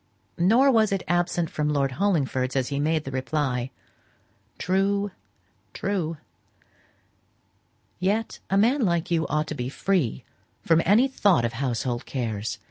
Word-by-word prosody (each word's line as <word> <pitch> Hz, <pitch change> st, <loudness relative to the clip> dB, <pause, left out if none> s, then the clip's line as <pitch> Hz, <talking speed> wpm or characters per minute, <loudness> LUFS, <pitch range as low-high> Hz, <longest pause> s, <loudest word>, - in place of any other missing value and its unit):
Nor 235 Hz, +10 st, +5 dB
was 220 Hz, -4 st, +3 dB
it 195 Hz, -2 st, -1 dB
absent 175 Hz, -1 st, 0 dB
from 150 Hz, 0 st, -1 dB
Lord 140 Hz, -2 st, +1 dB
Hollingford's 135 Hz, -7 st, 0 dB
as 130 Hz, -2 st, 0 dB
he 140 Hz, -, -2 dB
made 155 Hz, 0 st, 0 dB
reply, 130 Hz, -2 st, -1 dB, 0.9 s
"True, 200 Hz, +2 st, 0 dB, 0.6 s
true. 180 Hz, -5 st, -2 dB, 1.8 s
Yet 205 Hz, +5 st, -1 dB
a 195 Hz, -, +2 dB
man 245 Hz, +8 st, +3 dB
like 170 Hz, -5 st, 0 dB
you 165 Hz, -1 st, +1 dB
ought 150 Hz, +1 st, 0 dB
to 155 Hz, -, -5 dB
be 125 Hz, -3 st, -4 dB
free 150 Hz, -, -1 dB, 0.4 s
from 165 Hz, 0 st, +4 dB
any 220 Hz, +8 st, +5 dB
thought 200 Hz, -, +2 dB
of 115 Hz, -, -2 dB
household 120 Hz, -1 st, -2 dB
cares. 115 Hz, -5 st, -3 dB
165 Hz, 130 wpm, -25 LUFS, 135-195 Hz, 1.8 s, Nor